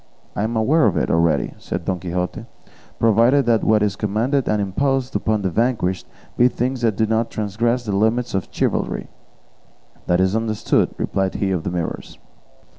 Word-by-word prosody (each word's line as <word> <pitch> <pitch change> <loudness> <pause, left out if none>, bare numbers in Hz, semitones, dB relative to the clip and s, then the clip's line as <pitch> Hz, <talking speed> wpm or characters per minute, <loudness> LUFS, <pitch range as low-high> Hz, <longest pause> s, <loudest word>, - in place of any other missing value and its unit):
"I - - -2
am 110 +2 -1
aware 135 +5 +3
of 95 -5 0
it - - 0
already," 80 -5 +1
said 85 -1 -5
Don 95 0 -1
Quixote; 90 +5 -3 0.5
"provided 115 +5 +3 0.2
what 105 -1 +3
is 105 -1 0
commanded 115 +7 0
and 105 - +1
imposed 130 +6 -1
upon 110 -2 0
the 95 - 0
vanquished 110 -5 0 0.3
be 120 - +5
things 125 +1 -2
that 115 -4 +1
do 110 - +2
not 110 +1 0
transgress 115 +4 -1
the 100 -3 -1
limits 115 +4 +1
of 95 -1 -1
chivalry." - - -2 1.0
"That 90 0 +2
is 95 +2 +2
understood," 110 -1 +1
replied 95 -1 -1
he 100 -1 -1
of 90 -3 0
the - - -3
Mirrors. 85 -2 -4
110 Hz, 170 wpm, -21 LUFS, 95-120 Hz, 1.0 s, be